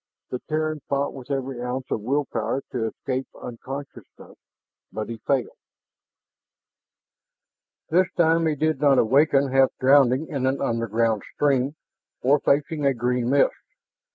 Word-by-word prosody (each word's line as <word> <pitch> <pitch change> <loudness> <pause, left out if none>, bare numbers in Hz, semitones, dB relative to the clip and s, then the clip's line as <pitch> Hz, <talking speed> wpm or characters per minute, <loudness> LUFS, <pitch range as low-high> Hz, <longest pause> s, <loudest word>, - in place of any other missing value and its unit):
The 125 - -3
Terran 155 0 -1
fought 140 0 0
with 130 -1 -11
every 135 -2 -3
ounce 125 +1 -3
of - - -1
will 140 +6 0
power 115 +4 -2
to 115 -3 -1
escape 130 +3 -4
unconsciousness, 135 +4 -9 0.6
but 110 +1 -5
he 115 - -5
failed. 135 -3 0 2.4
This 180 +2 +3
time 165 -1 +3
he 155 - +1
did 155 -1 0
not 140 -2 +5
awaken 135 +3 +3
half 135 0 +5
drowning 135 +1 +4
in 135 -5 -2
an 135 +1 0
underground 115 -3 0
stream 140 0 +1 0.5
or 140 +3 +4
facing 150 +2 0
a 140 -1 +2
green 120 0 0
mist. 140 +1 +3
135 Hz, 135 wpm, -24 LUFS, 125-145 Hz, 2.4 s, not